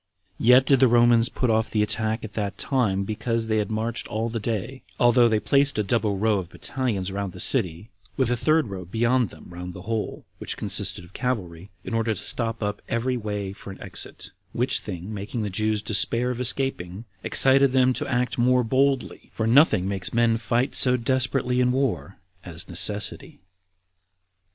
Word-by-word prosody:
Yet 125 +3 +5
did 135 -2 +4
the 130 - +6
Romans 120 0 +4
put 125 -3 -1
off 110 0 +1
the 105 -1 +1
attack 110 +2 0
at 110 -2 -8
that 100 -2 -4
time, 105 -8 0
because 115 +2 -2
they 110 -1 0
had 105 0 -1
marched 110 +2 -3
all 110 +2 -3
the 115 0 -4
day, 115 +4 -4 0.2
although 120 -1 +5
they 110 -1 +1
placed 140 +2 +2
a 105 - +1
double 105 -1 0
row 105 0 +1
of 90 -3 -7
battalions 105 -5 -3
round 100 -2 -4
the - - -10
city, 90 +6 +1 0.3
with 130 -3 +1
a - - +2
third 155 0 +1
row 95 -2 -6
beyond 115 +4 0
them - - -15
round 90 +1 -8
the 90 - -9
whole, 110 +1 -4
which - - -5
consisted - - +1
of 90 - -17
cavalry, 100 -8 -4
in - - -6
order 115 -1 0
to - - -5
stop 115 -2 -1
up 105 0 -3
every 120 +2 -1
way 105 -4 -4
for 100 - -12
an 95 - -10
exit; - - -9 0.2
which - - 0
thing 90 +4 -7
making 105 +3 -4
the 105 - -4
Jews 110 +1 -1
despair 115 +4 +1
of 125 0 -5
escaping, 115 -6 -1 0.2
excited 135 +4 +5
them 130 -1 +3
to - - -4
act 125 -1 -1
more 125 +1 +3
boldly; 135 +2 0
for 110 - -3
nothing 115 - +4
makes 100 +2 -2
men 115 -1 +3
fight 120 +3 -1
so 125 -1 +5
desperately 125 0 0
in 125 0 +2
war 130 -7 -2 0.3
as 85 -1 -7
necessity. 100 +3 -2
115 Hz, 190 wpm, -24 LUFS, 100-125 Hz, 0.3 s, the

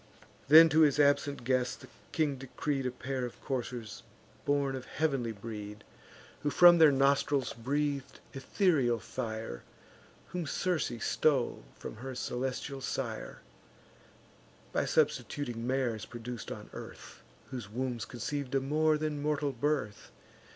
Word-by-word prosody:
Then 160 +3 +10
to 160 - +3
his 150 -2 +5
absent 145 -2 +3
guest 125 0 0
the - - -11 0.2
king 155 -4 +1
decreed 135 +1 -2
A - - -2
pair 130 +1 -4
of 120 - -6
coursers 120 -4 -4 0.4
born 140 -1 +1
of 130 -1 -6
heav'nly 135 -7 -1
breed, 105 -1 -7 0.6
Who 145 - 0
from 175 +3 +8
their 160 -2 +8
nostrils 140 0 +2
breath'd 140 +3 -2
ethereal 135 - +2
fire; 110 - -5 0.7
Whom 175 -4 -4
Circe 180 +2 0
stole 135 -2 +1 0.2
from - - -8
her 130 +2 -6
celestial 130 +2 -3
sire, 120 -4 -4 1.3
By - - +1
substituting 120 -5 0
mares 120 -5 -1
produc'd 120 0 -7
on - - -8
earth, - - -10 0.3
Whose 120 -6 -6
wombs 120 -1 -3
conceiv'd 135 +2 -4
a - - +4
more 155 +3 +2
than 150 -1 -2
mortal 145 -1 0
birth. 135 -5 -2
135 Hz, 130 wpm, -31 LUFS, 120-145 Hz, 1.3 s, Then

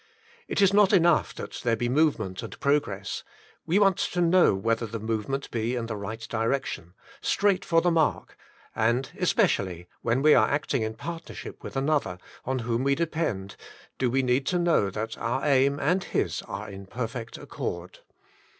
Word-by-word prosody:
It 200 - +1
is 195 0 +5
not 205 0 +5
enough 170 -3 +4
that - - -7
there 115 -1 +2
be 120 +2 -1
movement 120 - +1
and - - -8
progress, 120 -9 0 0.4
we 170 +4 +3
want 195 -3 +4
to 180 - -1
know 175 - +4
w^hether 115 +2 0
the 115 +1 -4
movement 115 +5 -3
be 115 +2 -1
in 120 -2 -2
the 115 -1 -4
right 105 +3 -6
direction, 115 -6 -2 0.3
straight 200 -2 +2
for 165 0 +3
the 175 - +2
mark; 160 -2 0 0.4
and 120 +4 +1
especially 100 - +1
when 125 +4 +1
we 155 0 +7
are 110 -4 +5
acting 145 -3 0
in 110 0 -2
partnership 170 -1 -8
with - - -8
another, 140 - 0 0.3
on 130 +1 -1
whom 120 +1 0
we 140 0 +3
are - - +1
dependent, 155 - -2 0.4
do 130 - +2
we 135 +2 +1
need 130 +2 +1
to 180 - +1
know 170 - +2
that 110 +3 -5
our 125 +5 -1
aim 140 0 +3
and 180 +7 +1
his - - -1
are 100 +2 -5
in 100 -1 -9
perfect 115 0 -5
accord. 85 0 -6
125 Hz, 175 wpm, -27 LUFS, 110-160 Hz, 0.4 s, we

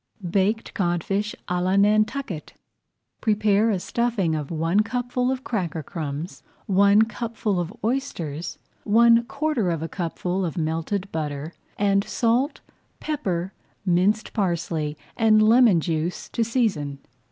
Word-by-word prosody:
BAKED 200 +5 0
CODFISH 195 +3 -1
À 180 0 0
LA 185 +1 +2
NANTUCKET 210 - +1 0.7
Prepare 215 0 +3
a 205 - +1
stuffing 225 -5 0
of 150 -3 -3
one 165 +4 +1
cupful 245 +3 0
of 260 0 -2
cracker 175 -8 -2
crumbs, 155 +1 -5 0.2
one 200 +2 +5
cupful 225 -4 -2
of 175 0 -3
oysters, 180 - -3 0.3
one 230 +2 +5
quarter 280 - -1
of 165 -2 -2
a - - -2
cupful 180 +2 -2
of 170 -2 -3
melted 165 +5 -2
butter, 150 0 -4 0.2
and 200 -1 +2
salt, 240 +6 0 0.4
pepper, 190 - -2 0.3
minced 190 +4 +2
parsley, 165 -6 -1 0.2
and 215 -2 +5
lemon 225 -4 +6
juice 165 +1 -2
to 230 - 0
season. 215 - 0
200 Hz, 125 wpm, -24 LUFS, 170-225 Hz, 0.7 s, lemon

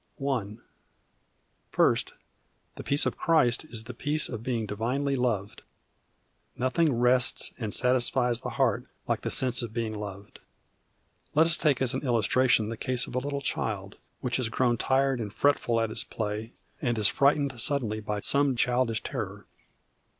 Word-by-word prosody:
I. 110 -7 -1 1.1
First, - - +2 0.6
the - - -8
peace 140 +1 +2
of - - -1
Christ 155 -6 +3
is 115 -7 -7
the 125 +2 -8
peace 150 +5 0
of 115 -3 -5
being 120 -2 -2
divinely 125 +7 -1
loved. 115 -6 -1 1.0
Nothing 145 +6 +2
rests 125 +1 +3
and 110 -3 -3
satisfies 125 0 +2
the - - -4
heart 130 -7 +1 0.2
like - - 0
the - - -3
sense 130 -1 +1
of 115 -2 -6
being 115 -2 -2
loved. 100 -1 -8 1.0
Let 160 +2 +6
us 165 0 +3
take 140 -6 +1
as 125 - +1
an 130 - -2
illustration 120 -2 +2
the 115 - -5
case 125 0 0
of - - -10
a 125 - +1
little 140 +1 -3
child, 100 -6 -3 0.2
which 125 -2 0
has 125 -3 -1
grown 120 0 +1
tired 135 +2 +1
and 105 -3 -4
fretful 120 -3 +2
at 115 -1 -1
its - - -2
play, 110 +1 -4 0.3
and 120 -2 0
is 105 -1 +4
frightened 140 -1 +2
suddenly 115 -7 0
by 105 -1 -3
some 140 +1 +2
childish 120 -2 +1
terror. - - -5
125 Hz, 160 wpm, -28 LUFS, 110-135 Hz, 1.1 s, Let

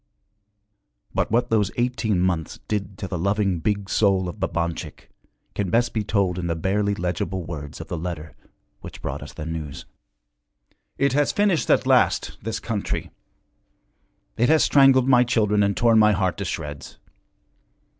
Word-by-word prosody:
But - - 0
what 120 +2 +1
those 105 -3 +2
eighteen 120 -5 0
months 90 -3 -1
did 100 -2 -3
to 100 - -5
the 90 -3 -4
loving 100 -1 0
big 100 +2 -1
soul 95 -2 +2
of 90 - -7
Babanchik 85 -1 -4 0.4
can 100 -3 -2
best 120 +5 +1
be 110 - -1
told 100 -4 0
in 85 - -3
the 85 - -1
barely 100 +4 0
legible 90 +1 -3
words 75 -3 -7
of 80 - -8
the 85 - -4
letter 80 -4 -6 0.4
which - - -10
brought - - -4
us - - -9
the 75 - -7
news. 80 -3 -6 1.1
'It 140 -1 +2
has 145 0 +2
finished 205 -6 +1
us - - +5
at - - -16
last, - - +2
this 110 0 -3
country! 110 -3 -3 1.3
It 120 - +3
has 160 0 +5
strangled 135 -2 +5
my 125 -2 +6
children 105 -4 +2
and 100 -1 +1
torn 115 -2 +4
my 105 0 +5
heart 95 -2 0
to 100 - -4
shreds! 75 -5 -6
100 Hz, 165 wpm, -23 LUFS, 90-115 Hz, 1.3 s, my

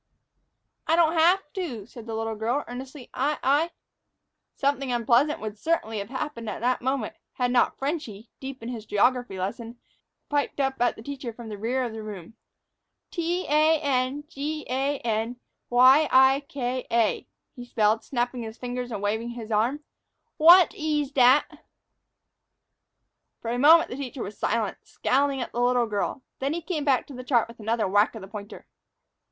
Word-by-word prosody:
"I 325 - +4
don't 335 -1 +4
haf' 350 +4 +4
to," 270 - -4
said 235 0 -12
the 225 - -4
little 225 0 -2
girl, 230 +6 -1
earnestly; 255 +2 -9
"I 290 +3 0
I 290 +5 +3 0.4
" - - -55
Something 275 -2 0
unpleasant 240 +5 +2
would 215 -1 -6
certainly 225 -9 -1
have 200 +1 -6
happened 260 -4 -4
at 200 - -5
that 250 +1 +1
moment, 260 -3 -1 0.2
had 245 -1 0
not 245 - +2
"Frenchy," 270 - -4
deep 265 -2 -8
in 230 - -5
his 225 -3 -7
geography 245 -1 +1
lesson, 225 +5 -5 0.5
piped 290 -1 -1
up 270 -2 -1
at 245 - +2
the 220 - -11
teacher 270 -2 -6
from 230 0 -10
the 210 - -6
rear 250 +5 0
of 235 -3 -4
the 220 - -6
room. 205 -3 -8 0.8
"T 345 +1 -1
a 310 +1 +4
n 275 0 0
g 305 0 -4
a 270 +3 0
n 225 +1 -1 0.3
y 260 +5 +6
i 265 +1 +6
k 255 -2 -3
a," 230 -2 +1 0.3
he 245 - -8
spelled, 220 -2 +1
snapping 245 -1 -2
his 225 0 -7
fingers 245 0 -5
and 205 -2 -4
waving 220 +3 -1
his 235 -2 -7
arm. 235 +8 +1 0.6
"Wot 345 +3 +8
eez 300 -2 -1
dat?" 260 +2 +4 1.8
For 230 - -4
a 245 - -1
moment 320 +5 +6
the 250 - -5
teacher 270 -2 -5
was 200 - -7
silent, 220 -3 -1
scowling 275 +1 0
down 255 - -1
at - - -16
the 240 - -2
little 245 0 +3
girl. 215 +5 -3 0.2
Then 275 +3 -1
he 340 - -3
came 315 -4 -3
back 270 -4 +2
to 285 - -11
the 255 0 -7
chart 245 -3 +2
with 235 0 -14
another 225 0 0
whack 205 +4 +3
of 220 - -7
the - - -9
pointer. 205 +1 -9
250 Hz, 180 wpm, -26 LUFS, 225-285 Hz, 1.8 s, Wot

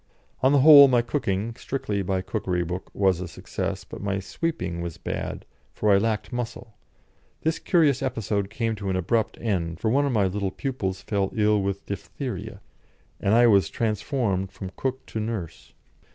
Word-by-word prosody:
On 130 - +4
the 140 -2 +5
whole, 145 -1 +10
my 125 -2 +3
cooking 115 -4 -1
(strictly 105 -6 -3
by 95 0 -1
cookery 90 -2 -1
book) 90 +2 -5
was 95 -3 +2
a 90 - -4
success, - - -4
but - - -9
my 100 -1 -1
sweeping 95 - -3
was 85 -1 -5
bad, - - -5 0.3
for 105 - +2
I 100 - +6
lacked 110 +3 -1
muscle. 120 -1 -5 0.7
This 160 0 0
curious 150 -7 +3
episode 105 -5 -1
came 115 +1 -1
to 100 -1 -4
an 95 - 0
abrupt 110 +5 0
end, 85 -7 -2
for 110 - 0
one 140 +3 +3
of - - 0
my 105 -5 +2
little 100 +1 -1
pupils 95 -5 -3
fell 100 -2 0
ill 105 -1 +3
with 100 0 -3
diphtheria, 105 -1 -6 0.6
and 100 +3 +2
I 120 +1 +6
was 100 -4 +5
transformed 110 -3 -1
from 95 -2 -7
cook 130 0 -3
to 110 - -5
nurse. 105 -7 -5
105 Hz, 175 wpm, -25 LUFS, 95-120 Hz, 0.7 s, whole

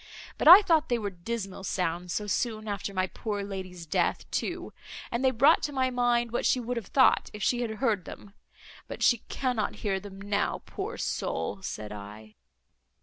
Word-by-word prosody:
But - - +1
I 370 +5 +11
thought 320 -4 +2
they 240 - +2
were 205 -3 -3
dismal 195 +1 -5
sounds, 180 -2 -2
so 210 - -2
soon 215 +1 -2
after 200 -1 -3
my 185 -1 0
poor 205 +1 -4
lady's 185 -3 -7
death 155 - 0
too; - - -3 0.4
and 235 +2 -1
they 260 - +5
brought 270 +6 +5
to 295 - -2
my 260 -2 0
mind 240 -1 +1
what 240 - -1
she 255 - +3
would 245 +1 -3
have 230 -5 -5
thought, 260 -2 +4
if 210 -1 -6
she 245 +4 +1
had 235 - -1
heard 215 -6 0
them—but 205 0 -11
she 240 - +4
cannot 250 -6 -1
hear 195 -2 +1
them 195 -1 -11
now, 200 +1 -1
poor - - -5
soul! 195 - -3
said 105 - -6
I." 105 +1 -10
210 Hz, 185 wpm, -28 LUFS, 190-245 Hz, 0.4 s, I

